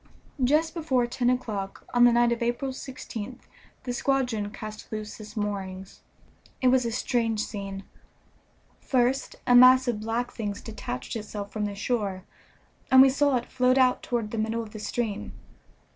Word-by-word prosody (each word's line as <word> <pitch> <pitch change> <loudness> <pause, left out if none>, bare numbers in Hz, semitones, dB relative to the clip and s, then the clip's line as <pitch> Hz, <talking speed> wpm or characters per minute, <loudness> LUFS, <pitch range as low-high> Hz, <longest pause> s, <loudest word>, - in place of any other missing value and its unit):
Just 305 +5 +2
before 280 -8 +1
ten 245 0 0
o'clock 210 -6 -3
on 245 0 +6
the 240 - +6
night 240 0 +4
of 235 - -1
April 240 +3 -1
16th 255 -2 -7 0.4
the 245 - -3
squadron 250 -6 0
cast 215 0 -9
loose 215 0 -6
its 215 0 -10
moorings. 195 -2 -4 0.6
It 255 - +4
was 255 -1 +3
a 230 - -1
strange 225 -2 0
scene. 195 -2 -6 1.0
First 260 +1 0
a 245 - +4
mass 255 +1 +8
of 235 -3 0
black 230 +3 -2
things 205 -2 -4
detached 215 - -6
itself 210 -2 -6
from 215 -1 -1
the 205 -1 -4
shore, 200 -3 -2 0.7
and 260 - +7
we 270 - +5
saw 285 0 +2
it 240 - -4
float 255 0 +2
out 255 -1 +4
toward 230 -4 -2
the 225 - -3
middle 225 +1 -1
of 215 - -11
the 215 - -8
stream. 215 -1 -3
235 Hz, 165 wpm, -27 LUFS, 210-255 Hz, 1.0 s, mass